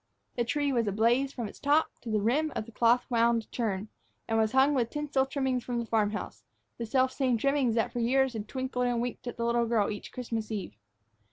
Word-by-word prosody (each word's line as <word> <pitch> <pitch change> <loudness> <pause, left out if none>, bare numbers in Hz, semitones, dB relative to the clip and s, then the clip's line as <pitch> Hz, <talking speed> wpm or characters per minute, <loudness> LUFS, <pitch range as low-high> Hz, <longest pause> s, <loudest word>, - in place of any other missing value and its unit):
The 240 - +1
tree 285 +3 0
was 235 -3 +1
ablaze 235 +7 +2
from 235 -5 -4
its - - -12
top 295 +3 +2
to 235 - -7
the 215 -1 +1
rim 300 +8 +1
of 215 - -2
the 230 - -12
cloth 235 +2 +3
wound 230 -1 +3
churn, 210 -4 -2 0.4
and 225 - 0
was 220 -1 +2
hung 270 +2 +5
with 240 -4 +1
tinsel 290 -2 0
trimmings 265 -3 -1
from 245 -1 -3
the 235 - -2
farm 220 -2 +2
house, 210 - -6 0.4
the 230 - -3
selfsame 260 0 +2
trimmings 275 -2 +1
that 225 - 0
for 245 - -2
years 260 +2 +2
had 215 -2 -5
twinkled 255 -1 -2
and 240 -1 0
winked 245 +1 -4
at 245 - -5
the 235 - -1
little 235 0 +2
girl 220 -3 +1
each 205 - -7
Christmas 230 -3 -4
eve. 200 - -4
240 Hz, 225 wpm, -29 LUFS, 225-265 Hz, 0.4 s, hung